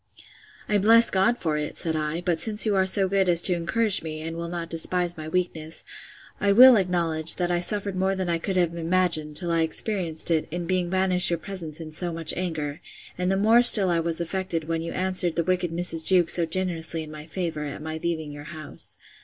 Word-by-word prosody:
I 210 Hz, -1 st, 0 dB
bless 230 Hz, +3 st, +4 dB
God 195 Hz, +6 st, 0 dB
for 155 Hz, -7 st, -3 dB
it, 150 Hz, 0 st, -6 dB
said 160 Hz, -1 st, -1 dB
I; 155 Hz, +2 st, -4 dB
but 175 Hz, -2 st, -3 dB
since 215 Hz, -1 st, +3 dB
you 210 Hz, -2 st, -1 dB
are 190 Hz, -1 st, 0 dB
so 195 Hz, 0 st, +3 dB
good 190 Hz, -1 st, -1 dB
as 170 Hz, -1 st, +4 dB
to 185 Hz, -, +8 dB
encourage 190 Hz, +5 st, +1 dB
me, 155 Hz, -1 st, -8 dB
and 165 Hz, +1 st, -7 dB
will 170 Hz, 0 st, -6 dB
not 170 Hz, -1 st, -6 dB
despise 175 Hz, +1 st, +1 dB
my 155 Hz, -1 st, -10 dB
weakness, 160 Hz, -2 st, -3 dB, 0.5 s
I 200 Hz, -1 st, +1 dB
will 255 Hz, +3 st, +7 dB
acknowledge, 170 Hz, -4 st, +1 dB
that 175 Hz, -1 st, -3 dB
I 175 Hz, -, -1 dB
suffered 200 Hz, +2 st, -4 dB
more 190 Hz, +1 st, -2 dB
than 190 Hz, -1 st, -5 dB
I 170 Hz, -1 st, -2 dB
could 190 Hz, +2 st, -3 dB
have 175 Hz, -2 st, 0 dB
imagined, 170 Hz, -3 st, 0 dB
till 170 Hz, +2 st, -1 dB
I 165 Hz, 0 st, 0 dB
experienced 165 Hz, -1 st, -1 dB
it, 160 Hz, -2 st, -1 dB
in 175 Hz, +2 st, -6 dB
being 180 Hz, -1 st, -3 dB
banished 185 Hz, -1 st, +3 dB
your 170 Hz, -, -2 dB
presence 170 Hz, -4 st, -8 dB
in 160 Hz, -1 st, -10 dB
so 175 Hz, +2 st, -2 dB
much 165 Hz, -1 st, +2 dB
anger; 160 Hz, -5 st, -6 dB, 0.3 s
and 180 Hz, +1 st, -3 dB
the 195 Hz, -, -1 dB
more 220 Hz, +4 st, +3 dB
still 210 Hz, -6 st, +8 dB
was 165 Hz, 0 st, -1 dB
I -, -, -2 dB
affected, 170 Hz, -3 st, -5 dB
when 165 Hz, 0 st, -3 dB
you 165 Hz, -, -7 dB
answered 185 Hz, -2 st, +2 dB
the 170 Hz, -, -1 dB
wicked 180 Hz, 0 st, -2 dB
Mrs. 165 Hz, -1 st, +2 dB
Jewkes 180 Hz, -3 st, +5 dB
so 170 Hz, -2 st, -1 dB
generously 165 Hz, -2 st, -4 dB
in 155 Hz, -, -12 dB
my 155 Hz, 0 st, -12 dB
favour, 165 Hz, -3 st, -6 dB
at 145 Hz, +1 st, -9 dB
my 160 Hz, 0 st, -7 dB
leaving 160 Hz, -3 st, -5 dB
your 145 Hz, 0 st, -12 dB
house. 155 Hz, -1 st, -3 dB
175 Hz, 225 wpm, -23 LUFS, 160-185 Hz, 0.5 s, to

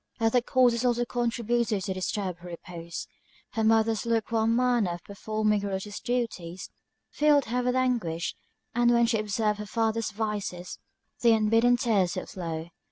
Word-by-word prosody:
Other 230 Hz, +2 st, +3 dB
causes 245 Hz, -1 st, +3 dB
also 240 Hz, -1 st, +2 dB
contributed 235 Hz, -3 st, 0 dB
to 190 Hz, -, -2 dB
disturb 185 Hz, -1 st, -3 dB
her 175 Hz, -, -11 dB
repose: 170 Hz, -1 st, -7 dB, 0.5 s
her 225 Hz, -, -1 dB
mother's 220 Hz, -1 st, +3 dB
luke 230 Hz, -1 st, 0 dB
warm 225 Hz, 0 st, +2 dB
manner 240 Hz, -7 st, +2 dB
of 175 Hz, -, -12 dB
performing 215 Hz, +1 st, -1 dB
her 205 Hz, -, -3 dB
religious 200 Hz, +1 st, -4 dB
duties, 190 Hz, -8 st, -3 dB, 0.4 s
filled 295 Hz, -2 st, +4 dB
her 245 Hz, +3 st, -1 dB
with 250 Hz, 0 st, 0 dB
anguish; 230 Hz, -11 st, 0 dB, 0.4 s
and 240 Hz, 0 st, +3 dB
when 235 Hz, 0 st, +5 dB
she 230 Hz, -1 st, +1 dB
observed 210 Hz, 0 st, 0 dB
her 210 Hz, -, -5 dB
father's 225 Hz, +1 st, 0 dB
vices, 205 Hz, -4 st, -4 dB, 0.4 s
the 235 Hz, -1 st, +5 dB
unbidden 225 Hz, +3 st, +4 dB
tears 215 Hz, -8 st, +1 dB
would -, -, -5 dB
flow. 165 Hz, -2 st, -5 dB
220 Hz, 160 wpm, -27 LUFS, 195-240 Hz, 0.5 s, when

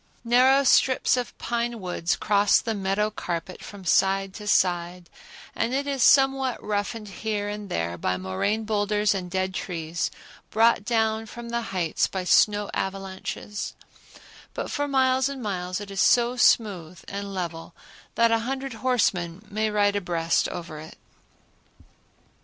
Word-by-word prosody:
Narrow 255 Hz, +3 st, +5 dB
strips 260 Hz, -1 st, +4 dB
of 250 Hz, -1 st, -4 dB
pine 235 Hz, 0 st, -2 dB
woods 180 Hz, -2 st, -1 dB
cross 205 Hz, -1 st, +3 dB
the 225 Hz, -, -3 dB
meadow 200 Hz, +1 st, 0 dB
carpet 180 Hz, -2 st, -5 dB
from 200 Hz, -2 st, -10 dB
side 195 Hz, +2 st, +2 dB
to 210 Hz, 0 st, -9 dB
side, 175 Hz, -2 st, +1 dB, 0.4 s
and 245 Hz, +3 st, -1 dB
it 280 Hz, +1 st, -1 dB
is 275 Hz, -2 st, -2 dB
somewhat 270 Hz, -1 st, +4 dB
roughened 210 Hz, +1 st, -3 dB
here 205 Hz, +1 st, -3 dB
and 205 Hz, -1 st, -6 dB
there 85 Hz, +1 st, -2 dB
by 90 Hz, +2 st, 0 dB
moraine 95 Hz, -, -1 dB
boulders 210 Hz, -1 st, +1 dB
and 185 Hz, -2 st, -4 dB
dead 185 Hz, +1 st, -1 dB
trees 170 Hz, -2 st, -3 dB, 0.4 s
brought 225 Hz, -1 st, +3 dB
down 225 Hz, -1 st, 0 dB
from 235 Hz, +2 st, -9 dB
the 235 Hz, 0 st, -1 dB
heights 175 Hz, -4 st, 0 dB
by 190 Hz, -1 st, -4 dB
snow 205 Hz, +3 st, +3 dB
avalanches; 195 Hz, +1 st, -4 dB, 0.8 s
but -, -, -4 dB
for 290 Hz, 0 st, -1 dB
miles 260 Hz, -1 st, +2 dB
and 270 Hz, -3 st, -6 dB
miles 185 Hz, -2 st, -3 dB
it 205 Hz, -1 st, -8 dB
is 195 Hz, -, -1 dB
so 240 Hz, 0 st, +4 dB
smooth 185 Hz, -8 st, +2 dB
and 200 Hz, 0 st, -5 dB
level 170 Hz, -2 st, -5 dB, 0.4 s
that 230 Hz, 0 st, +4 dB
a 230 Hz, -, +3 dB
hundred 265 Hz, +2 st, -4 dB
horsemen 195 Hz, -7 st, 0 dB
may 215 Hz, +1 st, 0 dB
ride 205 Hz, -1 st, +2 dB
abreast 170 Hz, -4 st, 0 dB
over 165 Hz, -3 st, -7 dB
it. 160 Hz, +1 st, -11 dB
205 Hz, 145 wpm, -25 LUFS, 180-235 Hz, 0.8 s, Narrow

